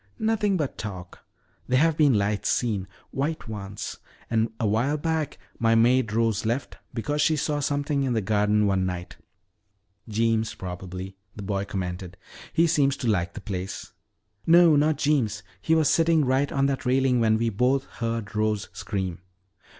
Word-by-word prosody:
"Nothing 215 Hz, -3 st, +1 dB
but 150 Hz, -5 st, -3 dB
talk. 95 Hz, -4 st, -7 dB, 0.4 s
There 130 Hz, -, +2 dB
have 160 Hz, +3 st, +3 dB
been 145 Hz, -5 st, +4 dB
lights 100 Hz, +1 st, 0 dB
seen, 105 Hz, -6 st, 0 dB, 0.2 s
white 150 Hz, +2 st, -2 dB
ones. 100 Hz, -2 st, -6 dB, 0.3 s
And 110 Hz, 0 st, +1 dB
a 115 Hz, -, 0 dB
while 120 Hz, +8 st, +1 dB
back 160 Hz, -1 st, -2 dB, 0.2 s
my 115 Hz, 0 st, +3 dB
maid 120 Hz, 0 st, +3 dB
Rose 110 Hz, -2 st, +1 dB
left 120 Hz, +5 st, -2 dB
because 145 Hz, +6 st, -2 dB
she 160 Hz, +1 st, +3 dB
saw 150 Hz, 0 st, -1 dB
something 145 Hz, 0 st, 0 dB
in 130 Hz, -2 st, 0 dB
the 115 Hz, -, +2 dB
garden 105 Hz, +1 st, +2 dB
one 95 Hz, -2 st, +2 dB
night." 90 Hz, -1 st, -6 dB, 0.9 s
"Jeems, 110 Hz, 0 st, +1 dB
probably," 95 Hz, +1 st, -7 dB, 0.2 s
the 105 Hz, -, -7 dB
boy 100 Hz, 0 st, -2 dB
commented. 90 Hz, -2 st, -5 dB, 0.3 s
"He 165 Hz, -, +3 dB
seems 140 Hz, -4 st, +2 dB
to 125 Hz, -, -3 dB
like 95 Hz, -5 st, +1 dB
the -, -, -6 dB
place." 95 Hz, -2 st, -5 dB, 0.5 s
"No, 170 Hz, -1 st, +7 dB
not 150 Hz, +1 st, +3 dB
Jeems. 125 Hz, -9 st, +1 dB, 0.2 s
He 160 Hz, -, +2 dB
was 160 Hz, -2 st, +3 dB
sitting 165 Hz, -2 st, +3 dB
right 130 Hz, +2 st, +1 dB
on 135 Hz, 0 st, +1 dB
that 140 Hz, -1 st, -1 dB
railing 130 Hz, 0 st, +2 dB
when 110 Hz, -1 st, +3 dB
we 115 Hz, +1 st, +1 dB
both 125 Hz, +6 st, +1 dB
heard 115 Hz, -2 st, -3 dB
Rose 105 Hz, -1 st, 0 dB
scream." 95 Hz, -5 st, -3 dB
115 Hz, 165 wpm, -25 LUFS, 105-145 Hz, 0.9 s, No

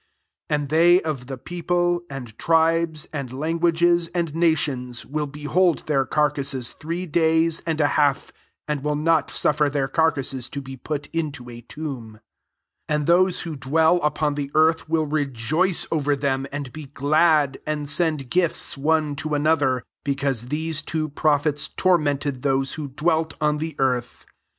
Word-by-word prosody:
9 150 Hz, -1 st, +1 dB
And 145 Hz, -, -4 dB
bey 170 Hz, +4 st, +5 dB
of 145 Hz, -6 st, -4 dB
the 135 Hz, -1 st, -5 dB
people, 175 Hz, +3 st, -1 dB
and 125 Hz, -5 st, -8 dB
tribes, 165 Hz, -1 st, +2 dB
tnd 135 Hz, -4 st, -5 dB
languages, 170 Hz, +3 st, +2 dB
and 170 Hz, -4 st, -1 dB
nations, 145 Hz, -7 st, 0 dB
^ill 150 Hz, 0 st, -3 dB
behold 160 Hz, +4 st, +1 dB
their 135 Hz, -3 st, +1 dB
carcases 140 Hz, -4 st, 0 dB
three 170 Hz, +4 st, -5 dB
lays 160 Hz, 0 st, +2 dB
and 160 Hz, -1 st, -1 dB
a 150 Hz, -, +4 dB
half, 145 Hz, -2 st, +1 dB, 0.3 s
and 150 Hz, -2 st, -2 dB
will 150 Hz, 0 st, 0 dB
not 160 Hz, +1 st, +2 dB
ufifer 150 Hz, -1 st, +1 dB
their 140 Hz, -2 st, 0 dB
carcases 135 Hz, -4 st, 0 dB
to 140 Hz, -, -5 dB
be 135 Hz, -1 st, -8 dB
put 145 Hz, +2 st, -5 dB
Qto 145 Hz, -7 st, -4 dB
a 120 Hz, -, -10 dB
tomb. 125 Hz, -4 st, -7 dB, 0.7 s
10 150 Hz, -, 0 dB
And 150 Hz, -1 st, -1 dB
those 180 Hz, +2 st, +3 dB
wftfydwell 160 Hz, +3 st, +2 dB
upon 150 Hz, 0 st, 0 dB
he 140 Hz, -1 st, -3 dB
earth 160 Hz, 0 st, +3 dB
will 160 Hz, -1 st, +1 dB
rejoice 150 Hz, +4 st, 0 dB
over 145 Hz, -2 st, +1 dB
them, 135 Hz, -1 st, -1 dB
jid 140 Hz, -3 st, -5 dB
be 155 Hz, -1 st, -8 dB
glad, 150 Hz, 0 st, +2 dB
and 150 Hz, -1 st, -2 dB
send 155 Hz, -4 st, -1 dB
gifts 175 Hz, -2 st, +1 dB
one 150 Hz, +1 st, +1 dB, 0.2 s
another; 145 Hz, -4 st, +2 dB, 0.2 s
because 135 Hz, -4 st, -1 dB
these 155 Hz, +2 st, -2 dB
two 155 Hz, +1 st, -3 dB
►rophets 145 Hz, 0 st, 0 dB
tormented 145 Hz, -7 st, +1 dB
those 135 Hz, 0 st, 0 dB
who 155 Hz, -, -5 dB
1 135 Hz, -1 st, -11 dB
welt 160 Hz, -1 st, +2 dB
on 150 Hz, -1 st, +1 dB
the 160 Hz, -1 st, -4 dB
earth." 125 Hz, -2 st, -1 dB
150 Hz, 155 wpm, -23 LUFS, 140-160 Hz, 0.7 s, bey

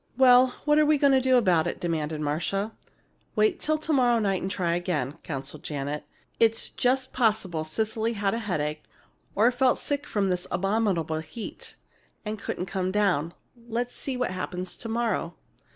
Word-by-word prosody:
"Well, 255 Hz, -1 st, +6 dB
what 300 Hz, 0 st, +4 dB
are 305 Hz, -, +5 dB
we 305 Hz, 0 st, +4 dB
going 280 Hz, -1 st, +4 dB
to 265 Hz, -, +4 dB
do 260 Hz, 0 st, +4 dB
about 180 Hz, -8 st, +3 dB
it?" -, -, -4 dB
demanded 155 Hz, -3 st, -2 dB
Marcia. 180 Hz, +8 st, -1 dB, 0.6 s
"Wait 390 Hz, -5 st, +2 dB
till 310 Hz, 0 st, +1 dB
to 310 Hz, +1 st, -2 dB
morrow 245 Hz, -3 st, +4 dB
night 195 Hz, -4 st, 0 dB
and 190 Hz, -, -2 dB
try 175 Hz, -3 st, 0 dB
again," 170 Hz, -5 st, -2 dB
counseled 140 Hz, 0 st, -6 dB
Janet. 145 Hz, 0 st, -4 dB, 0.3 s
"It's 225 Hz, -1 st, +2 dB
just 255 Hz, +1 st, 0 dB
possible 210 Hz, -9 st, +1 dB
Cecily 220 Hz, +7 st, -1 dB
had 200 Hz, -2 st, 0 dB
a 230 Hz, -, -1 dB
headache 155 Hz, -8 st, -2 dB, 0.5 s
or 225 Hz, +5 st, +5 dB
felt 255 Hz, 0 st, +2 dB
sick 290 Hz, 0 st, -2 dB
from 200 Hz, -2 st, 0 dB
this 180 Hz, 0 st, -2 dB
abominable 195 Hz, -6 st, 0 dB
heat 160 Hz, +8 st, -8 dB, 0.5 s
and 215 Hz, 0 st, -4 dB
couldn't 180 Hz, -, -3 dB
come 185 Hz, -1 st, -2 dB
down. 180 Hz, -6 st, +1 dB, 0.3 s
Let's 240 Hz, +1 st, -2 dB
see 265 Hz, -2 st, -4 dB
what 250 Hz, -6 st, -1 dB
happens 185 Hz, 0 st, -4 dB
to 230 Hz, -, -7 dB
morrow." 225 Hz, -7 st, -1 dB
205 Hz, 170 wpm, -27 LUFS, 170-245 Hz, 0.6 s, Well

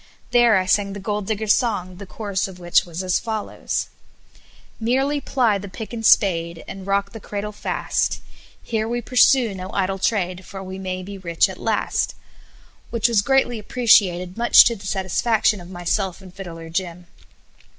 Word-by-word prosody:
There 240 Hz, -3 st, +5 dB
I 185 Hz, -, 0 dB
sang 195 Hz, +1 st, +1 dB
the 205 Hz, -, -6 dB
Gold 205 Hz, 0 st, -3 dB
Digger's 220 Hz, -1 st, +2 dB
Song, 185 Hz, -7 st, -1 dB
the 200 Hz, 0 st, -9 dB
chorus 200 Hz, -1 st, -3 dB
of 190 Hz, -2 st, -11 dB
which 175 Hz, -1 st, +2 dB
was 175 Hz, +1 st, -6 dB
as 185 Hz, -1 st, +1 dB
follows: 220 Hz, -2 st, -3 dB, 0.9 s
"Merely 270 Hz, +5 st, 0 dB
ply 235 Hz, -8 st, +1 dB
the 200 Hz, -, -8 dB
pick 220 Hz, +5 st, -8 dB
and 225 Hz, -1 st, -5 dB
spade, 170 Hz, -6 st, +3 dB
And 195 Hz, 0 st, -8 dB
rock 200 Hz, 0 st, 0 dB
the 225 Hz, -, -9 dB
cradle 205 Hz, 0 st, -5 dB
fast; 205 Hz, -, -1 dB, 0.4 s
Here 220 Hz, -1 st, -2 dB
we 240 Hz, +1 st, -1 dB
pursue 245 Hz, -1 st, +4 dB
no 185 Hz, 0 st, -7 dB
idle 195 Hz, 0 st, -1 dB
trade, 185 Hz, -3 st, -1 dB
For 195 Hz, +1 st, -8 dB
we 190 Hz, 0 st, -7 dB
may 185 Hz, -1 st, -4 dB
be 200 Hz, +1 st, -8 dB
rich 170 Hz, -3 st, +2 dB
at -, -, -9 dB
last." -, -, -1 dB, 0.7 s
which 230 Hz, -1 st, +1 dB
was 230 Hz, -4 st, +3 dB
greatly 255 Hz, -1 st, +1 dB
appreciated 195 Hz, -6 st, +2 dB
much 235 Hz, -, +8 dB
to 235 Hz, -, +1 dB
the 200 Hz, -2 st, -9 dB
satisfaction 210 Hz, +2 st, +1 dB
of 175 Hz, -, -12 dB
myself 180 Hz, +1 st, -2 dB
and 185 Hz, -2 st, -14 dB
Fiddler 165 Hz, -4 st, -9 dB
Jim. 175 Hz, 0 st, -3 dB
200 Hz, 170 wpm, -22 LUFS, 185-225 Hz, 0.9 s, much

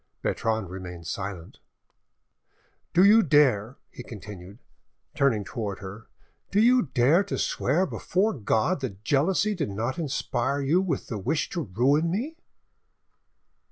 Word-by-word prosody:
Bertrande 110 Hz, -3 st, -1 dB
remained 90 Hz, -2 st, -8 dB
silent. 95 Hz, -1 st, -6 dB, 1.3 s
"Do 180 Hz, -, +5 dB
you 215 Hz, +3 st, +7 dB
dare," 135 Hz, -, +3 dB
he -, -, -9 dB
continued, 100 Hz, -4 st, -10 dB, 0.6 s
turning 125 Hz, -7 st, +2 dB
towards 100 Hz, -2 st, -5 dB
her,—"do 105 Hz, -, -7 dB
you 245 Hz, +3 st, +5 dB
dare 140 Hz, +8 st, +3 dB
to 200 Hz, -, -3 dB
swear 165 Hz, +9 st, +1 dB
before 195 Hz, +4 st, 0 dB
God 135 Hz, -, 0 dB
that 105 Hz, -6 st, -6 dB
jealousy 180 Hz, -, +2 dB
did 160 Hz, -, -3 dB
not 115 Hz, -, -3 dB
inspire 140 Hz, -3 st, -1 dB
you 150 Hz, +7 st, +2 dB
with 170 Hz, -8 st, -2 dB
the 110 Hz, -, -5 dB
wish 145 Hz, +10 st, -1 dB
to 170 Hz, -, -2 dB
ruin 140 Hz, -, +1 dB
me?" 245 Hz, -, -3 dB
130 Hz, 125 wpm, -26 LUFS, 105-170 Hz, 1.3 s, you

